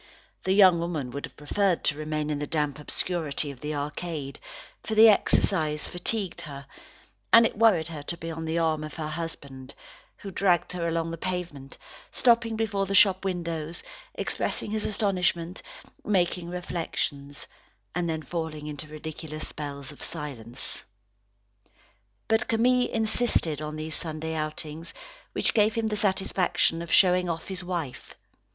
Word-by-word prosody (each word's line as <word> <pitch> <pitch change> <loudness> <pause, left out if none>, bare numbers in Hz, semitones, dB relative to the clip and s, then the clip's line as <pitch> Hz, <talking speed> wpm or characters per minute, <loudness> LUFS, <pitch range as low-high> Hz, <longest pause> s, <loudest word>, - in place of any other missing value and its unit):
The 190 - +3
young 190 -4 +7
woman 160 -7 -2
would 140 +3 -4
have - - -25
preferred 180 +5 +1
to 145 - +2
remain 155 0 -2
in 145 - -1
the 145 - -3
damp 150 -2 -1
obscurity 155 -2 -1
of 130 - -13
the 150 0 -3
arcade, 145 -1 -4 0.4
for 220 - -2
the 220 +1 +9
exercise 155 -7 +3
fatigued 190 +1 -2
her, 140 -3 -8 0.7
and 230 0 +9
it - - 0
worried 205 -7 +4
her 155 -3 -6
to 170 +4 -5
be 165 0 -5
on 160 0 -5
the 160 +1 -1
arm 160 -2 +1
of 155 -1 -7
her 155 -1 -4
husband, 140 -5 -6 0.4
who 195 - -8
dragged 175 -2 +2
her 175 -2 -2
along 165 0 -1
the 165 - -6
pavement, 175 -7 -4 0.3
stopping 235 -2 +3
before 205 -3 0
the 195 - 0
shop 190 -1 +6
windows, 170 -4 -3 0.3
expressing - - -1
his 215 -1 -1
astonishment, 180 -4 0 0.4
making 180 -3 +1
reflections, 160 -5 -3 0.5
and 175 -1 -1
then 160 -1 -2
falling 160 -1 -4
into 150 +1 -6
ridiculous 155 0 -5
spells 140 -2 -6
of 145 - -14
silence. 130 -6 -5 1.4
But 220 +2 +2
Camille 245 +2 +3
insisted 220 - +2
on 155 0 -4
these 155 +1 -4
Sunday 160 0 -2
outings, 155 +1 -4 0.4
which - - +1
gave 215 0 +3
him 230 -1 0
the 215 -1 0
satisfaction 190 -4 +1
of 170 - -6
showing 180 -1 +5
off 165 +1 -4
his 185 -2 -4
wife. 170 -7 -5
165 Hz, 155 wpm, -27 LUFS, 150-190 Hz, 1.4 s, the